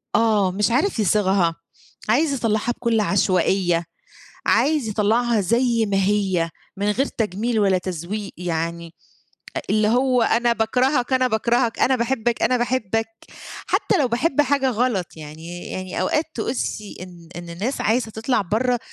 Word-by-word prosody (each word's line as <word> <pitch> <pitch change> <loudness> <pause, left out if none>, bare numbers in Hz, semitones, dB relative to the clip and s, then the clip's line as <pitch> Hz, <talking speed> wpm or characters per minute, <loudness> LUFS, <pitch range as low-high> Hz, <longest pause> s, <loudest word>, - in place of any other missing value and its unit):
آه، 210 -5 +3
مش 210 +4 0
عارف 280 - +1
يصيغها، 190 -4 +2 0.5
عايز 285 +5 +3
يطلّعها 225 -2 0
بكل 235 -2 0
عشوائية، 185 -3 +1 0.6
عايز 295 -5 +2
يطلّعها 220 +2 +1
زي 235 +3 +2
ما 195 -1 0
هي 190 -4 +1 0.3
من 205 +1 +1
غير 270 +6 +1
تجميل 220 +1 -2
ولا 195 -2 +3
تزويق. 185 +3 -5
يعني 170 -1 -3 0.6
أ - - -2
اللي 215 0 +2
هو 250 +1 +2
أنا 235 +1 +2
باكرهك، 250 +3 +1
أنا 255 0 +3
باكرهك، 235 +1 +1
أنا 260 - +3
باحبك، 235 -1 -1
أنا 255 - +3
باحبك 225 -3 -1 0.6
حتّى 400 - +1
لو 265 - +3
باحب 265 +5 +1
حاجة 275 -1 +1
غلط، 230 -6 0
يعني 160 +3 -9
يعني 185 0 -4
أوقات 305 - +1
تحسي 220 -3 -3
إن 175 -2 -12
إن 175 0 -8
الناس 205 +11 -3
عايزة 225 0 0
تطلع 220 +2 0
برّه 235 +6 0
220 Hz, 145 wpm, -22 LUFS, 190-245 Hz, 0.6 s, آه